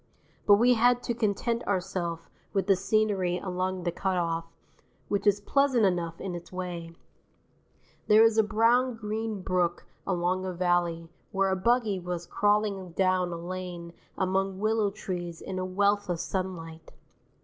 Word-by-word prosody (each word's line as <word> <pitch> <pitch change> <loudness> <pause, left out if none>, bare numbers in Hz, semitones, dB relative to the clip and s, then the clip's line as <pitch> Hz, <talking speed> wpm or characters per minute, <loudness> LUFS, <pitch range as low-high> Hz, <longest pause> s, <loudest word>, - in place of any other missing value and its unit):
But 205 - +9
we 240 +4 +5
had 245 +1 +3
to 235 - -1
content 230 +1 -1
ourself 180 -4 -2 0.3
with 195 -1 +1
the 195 0 +4
scenery 195 -2 +1
along 185 0 -3
the 175 - 0
cut 190 +1 -1
off, 165 -1 -1 0.6
which 205 0 0
is 205 0 +4
pleasant 260 +1 +2
enough 170 -3 -1
in 190 - -4
its 175 0 -8
way 175 -2 -6 1.1
there 215 +1 +7
is 225 -1 +4
a - - +6
brown 230 +4 +3
green 215 -2 -4
brook 180 -2 0 0.2
along 185 0 0
a 185 -1 -3
valley 175 -2 0 0.2
where 195 0 +1
a - - +2
buggy 220 0 +1
was 175 -1 -4
crawling 205 -2 0
down 185 -1 +1
a 170 - -4
lane 175 -1 -6 0.2
among 190 0 0
willow 215 0 +1
trees 175 -4 -5
in 185 -1 -5
a 185 - -2
wealth 200 +2 +1
of 175 -2 -1
sunlight. 165 -4 -5
190 Hz, 155 wpm, -28 LUFS, 175-210 Hz, 1.1 s, But